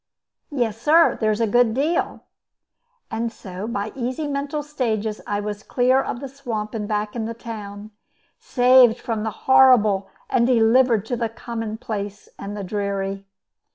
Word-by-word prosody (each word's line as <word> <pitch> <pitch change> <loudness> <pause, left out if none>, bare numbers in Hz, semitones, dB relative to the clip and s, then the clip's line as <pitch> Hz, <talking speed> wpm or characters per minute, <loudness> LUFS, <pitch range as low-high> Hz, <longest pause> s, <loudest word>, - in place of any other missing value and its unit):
"Yes, 230 -6 -2
sir, 325 +6 +5
there's 215 0 +1
a - - +4
good 230 +1 +3
deal." 300 +6 0 0.9
And 230 +1 -2
so, 190 -1 -8
by 210 -2 -3
easy 255 +4 -3
mental 285 +1 -3
stages, 225 -7 -2
I 205 0 -1
was 205 0 -5
clear 255 +3 +2
of 245 - -5
the 275 - -5
swamp 240 -6 -5
and 210 -2 -3
back 210 0 -2
in 225 -2 -2
the 230 +1 -5
town, 215 -3 -8 0.5
saved 250 -2 +5
from 225 -3 -3
the 220 - -1 0.2
horrible, 225 -7 +5 0.2
and 235 -1 +2
delivered 235 -2 +4
to 245 - -2
the 230 -1 -2
commonplace 220 -3 -6
and 205 +1 -6
the 200 - -4
dreary. 195 0 -3
225 Hz, 155 wpm, -22 LUFS, 210-250 Hz, 0.9 s, sir